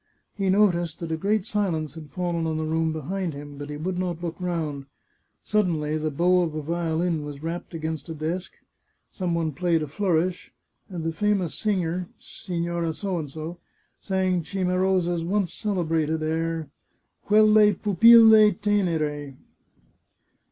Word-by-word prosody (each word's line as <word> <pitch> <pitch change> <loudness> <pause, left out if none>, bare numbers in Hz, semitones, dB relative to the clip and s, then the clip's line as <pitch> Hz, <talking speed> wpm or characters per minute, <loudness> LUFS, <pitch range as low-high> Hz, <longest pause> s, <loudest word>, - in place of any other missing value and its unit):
He 195 -2 -1
noticed 175 -5 +2
that 170 -1 -5
a - - +1
great 200 +4 0
silence 170 -9 -1
had 155 -2 -10
fallen 170 +1 -2
on 160 -1 -1
the 155 - -2
room 160 0 0
behind 165 +2 -3
him, 145 0 -9
but 145 0 -6
he 150 - -5
would 180 +4 -3
not 175 -2 -3
look 170 -1 -3
round. 155 -6 -3 0.6
Suddenly 165 -8 0
the 155 0 -1
bow 180 +5 +3
of 160 -3 -2
a 155 - -2
violin 165 0 -1
was 145 0 -8
rapped 170 +1 -5
against 160 -1 -4
a 160 - -5
desk, 165 +5 -3 0.6
some 180 -3 -2
one 165 -2 0
played 165 +2 0
a - - -4
flourish, 180 +2 -1 0.4
and 175 -4 -5
the 165 0 -2
famous 200 -3 0
singer, 180 -4 -1
Signora 170 -2 -3
P, 160 -3 -4 0.5
sang 185 -2 0
Ci 190 +4 -4
marosa's 180 -2 +1
once 190 0 0
celebrated 160 -6 -1
air, 165 0 -1 0.5
Quelle 215 -1 +5
pupille 220 +1 +7
tenere. 155 -9 0
170 Hz, 145 wpm, -25 LUFS, 160-185 Hz, 0.6 s, pupille